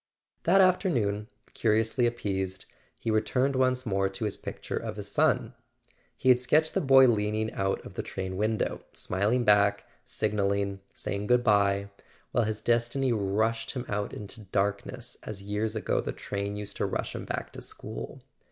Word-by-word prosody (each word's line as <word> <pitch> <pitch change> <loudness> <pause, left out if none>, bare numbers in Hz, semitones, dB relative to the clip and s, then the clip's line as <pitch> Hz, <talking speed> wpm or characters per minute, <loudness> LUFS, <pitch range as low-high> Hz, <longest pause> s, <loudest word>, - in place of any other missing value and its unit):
That 195 +3 +6
afternoon, 125 - +2 0.3
curiously 110 +2 +2
appeased, 95 -5 -3 0.3
he 115 - -1
returned 125 +5 +1
once 130 0 +2
more 95 -3 +1
to 105 +4 -4
his 105 - -1
picture - - -6
of - - -3
his 105 -1 -6
son. 135 -2 +2 0.6
He 130 - +1
had 125 -1 +7
sketched 155 +5 +3
the - - +1
boy 135 -2 +7
leaning 110 -1 0
out 95 0 -1
of - - -9
the - - -3
train 95 0 -5
window, 110 +3 0
smiling 105 +7 +1
back, 100 -2 +4 0.2
signalling, 100 -1 -1
saying 100 +1 -4
goodbye, 100 -4 +3 0.4
while 120 - +2
his 110 0 -3
destiny 120 +3 +1
rushed 110 +2 0
him 125 -2 -4
out 105 0 -2
into 105 +2 -7
darkness 100 +6 -2
as 100 -2 -7
years 105 +2 -2
ago 110 - 0
the - - -4
train 100 0 -4
used 105 -1 -6
to - - 0
rush - - -3
him - - -5
back - - -4
to - - -8
school. 60 +1 -7
110 Hz, 160 wpm, -28 LUFS, 100-120 Hz, 0.6 s, had